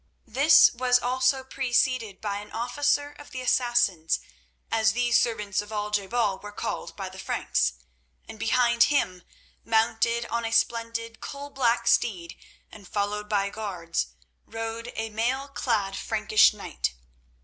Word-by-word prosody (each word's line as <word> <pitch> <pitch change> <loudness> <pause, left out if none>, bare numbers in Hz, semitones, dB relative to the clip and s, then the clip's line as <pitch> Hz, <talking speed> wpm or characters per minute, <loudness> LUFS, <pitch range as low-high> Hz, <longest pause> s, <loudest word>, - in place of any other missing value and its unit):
This 280 +7 +6
was 250 0 +3
also 255 +2 +1
preceded 255 -5 0
by 205 -2 -2
an 205 +1 -9
officer 290 +5 0
of 290 - -12
the 255 - -6
Assassins, 240 -10 +1 0.5
as 220 -1 +3
these 240 0 +3
servants 210 -5 -1
of 210 +1 -12
Al 210 -1 -3
je 205 -2 0
bal 210 -4 0
were 205 +1 -9
called - - -5
by 195 -2 -5
the 190 +1 -10
Franks, 125 - 0 0.5
and 220 - -10
behind 235 +1 +3
him, 185 -11 0 0.4
mounted 225 +1 +1
on 235 0 -2
a 225 - -2
splendid 230 0 0
coalblack 270 -5 -1
steed 195 -8 +1 0.4
and 200 -3 -13
followed 210 +1 -2
by 200 -2 +1
guards, 180 -6 -3 0.4
rode 225 +1 -5
a 225 0 -3
mail 250 +6 -1
clad 215 -8 -1
Frankish 215 -1 +3
knight. 65 - -4
225 Hz, 140 wpm, -26 LUFS, 205-245 Hz, 0.5 s, This